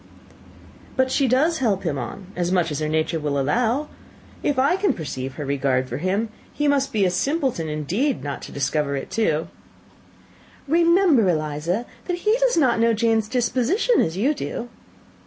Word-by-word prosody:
"But 260 0 +2
she 275 - +2
does 300 +7 +2
help 210 -7 +1
him 150 -6 -1
on, 185 +11 -6
as 175 0 -1
much 175 -3 +1
as 150 - -2
her 155 0 -1
nature 160 +1 0
will 145 -2 -1
allow. 240 - +1 0.5
If 290 - 0
I 275 +7 +3
can 385 -5 +1
perceive 135 -5 -5
her 150 - -5
regard 135 -2 0
for - - -4
him, 195 +8 -1 0.2
he 295 - -1
must 280 -1 +2
be 205 -3 +2
a 180 - +2
simpleton 260 - -1
indeed 185 - -1
not 140 -1 -4
to - - -9
discover 140 +1 -1
it 135 - -5
too." 165 -8 0 1.2
"Remember, 335 - +4
Eliza, 155 +6 -1 0.2
that 355 -1 -2
he 425 +5 +2
does - - +2
not 255 -7 +3
know 230 0 +4
Jane's 225 -1 +1
disposition 255 - +2
as 165 +2 -1
you 265 +9 +2
do." 245 -4 -5
220 Hz, 175 wpm, -23 LUFS, -, 1.2 s, Remember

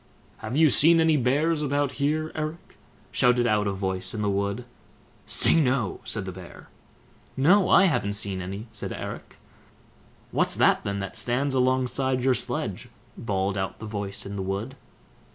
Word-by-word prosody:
"Have 110 +5 -4
you 155 -2 +5
seen 165 +6 +5
any 160 -1 +4
bears 150 +5 +1
about 145 -1 0
here, 155 +2 0
Eric?" 155 +2 -6 0.3
shouted 125 -1 +3
out 105 -2 +1
a - - 0
voice 95 0 -3
in 105 - -2
the 100 - +1
wood. 100 +4 -2 0.6
"Say, - - +3
no!" 125 -7 0
said 105 -3 -2
the 95 - -5
Bear. 90 -1 -12 0.7
"No, 180 +8 +4
I - - +6
haven't 105 - 0
seen 100 -2 -2
any", 100 +4 -6
said 110 - -5
Eric. - - -8 0.9
"What's - - +3
that - - +3
then, 100 0 -3
that 100 - -5
stands 130 +3 0
alongside 130 0 +1
your 130 0 +4
sledge?" - - -3 0.3
bawled 100 -2 -2
out 95 - -3
the 110 - -9
voice 100 -2 -5
in 100 0 -6
the - - -3
wood. 100 +7 -4
120 Hz, 165 wpm, -25 LUFS, 100-140 Hz, 0.9 s, I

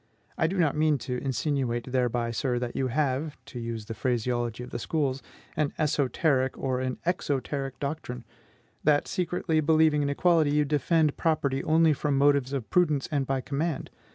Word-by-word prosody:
I 160 - +2
do 190 +4 -3
not 160 -5 +2
mean 155 -1 +3
to 125 -1 -2
insinuate 130 -3 -1
thereby, 120 -2 0
sir, 120 +2 -1
that 120 -1 -3
you 130 - 0
have 140 +3 -1
(to 125 - -8
use 115 -2 -5
the 115 - -5
phraseology 120 -1 -1
of 125 - -10
the - - -4
schools) 140 -4 -1 0.3
an 150 -2 0
ESOTERIC 140 -2 +1
and 130 -1 -1
an 130 -1 -2
EXOTERIC 140 -5 -2
doctrine, 140 -4 -4 0.6
that, 145 -1 +3
secretly 175 -3 0
believing 155 -1 +4
in 140 - 0
equality, 155 -1 +3
you 150 0 +3
defend 150 +1 +1
property 140 -4 0
only 160 0 +4
from 145 0 0
motives 140 -2 +3
of 135 -5 -3
prudence 155 -6 +2
and 140 -3 0
by 135 -1 0
command. 145 +3 -3
140 Hz, 170 wpm, -27 LUFS, 130-155 Hz, 0.6 s, believing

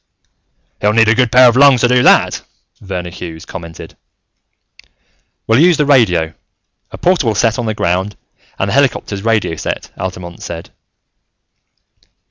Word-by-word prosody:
"He'll 105 0 +1
need 115 0 +3
a - - +5
good 125 -1 +1
pair 125 0 +6
of 120 - +2
lungs 135 -2 +5
to 125 - +3
do 125 0 +2
that," - - +3 0.4
Verner 90 -3 -6
Hughes 85 -3 -9
commented. 85 -3 -10 1.5
"We'll 115 +3 +2
use 170 0 +4
the 150 - +1
radio. 90 - +2 0.6
A - - -10
portable 160 - +1
set 115 +2 +1
on 120 - -3
the 110 - -2
ground, 95 +3 -2 0.4
and 95 - -2
the - - -3
helicopter's 125 -7 0
radio 110 -7 0
set," - - -5
Altamont 90 -2 -7
said. 85 -1 -8
110 Hz, 145 wpm, -15 LUFS, 90-125 Hz, 1.5 s, pair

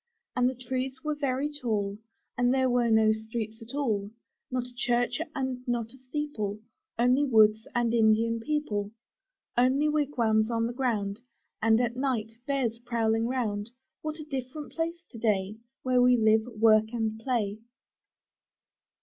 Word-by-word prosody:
And 250 0 +3
the 260 - -5
trees 260 +1 -4
were 305 0 0
very 280 -1 -1
tall, 210 -7 -2 0.4
And 245 0 +2
there 260 -1 +2
were 240 -1 +2
no 220 -1 +5
streets 220 +1 -4
at 225 +4 -9
all, 215 -8 0 0.4
Not 250 -1 -1
a 250 - -11
church 245 +4 0
and 260 -2 -2
not 235 -1 -1
a - - -14
steeple 255 -6 -3 0.2
— - - -59
Only 250 +4 +4
woods 220 -4 +4
and 240 -1 +2
Indian 230 0 +3
people. 225 -7 -1 0.7
Only 260 +5 +3
wigwams 240 -8 +2
on 230 -1 +1
the 235 - -3
ground, 225 -5 -1 0.4
And 225 0 +4
at 240 -1 0
night 250 -4 -1 0.2
bears 255 -5 0
prowling 230 -1 0
round 220 -4 -2 0.3
What 310 0 -3
a 310 - -7
different 280 0 -5
place 335 +1 -3
to 230 - -9
day 210 -2 0 0.3
Where 255 -1 +3
we 250 0 +5
live 220 0 +3
and 225 -3 -10
work 220 0 +5
and 220 -2 -1
play! 220 -4 -1
240 Hz, 160 wpm, -28 LUFS, 220-260 Hz, 0.7 s, no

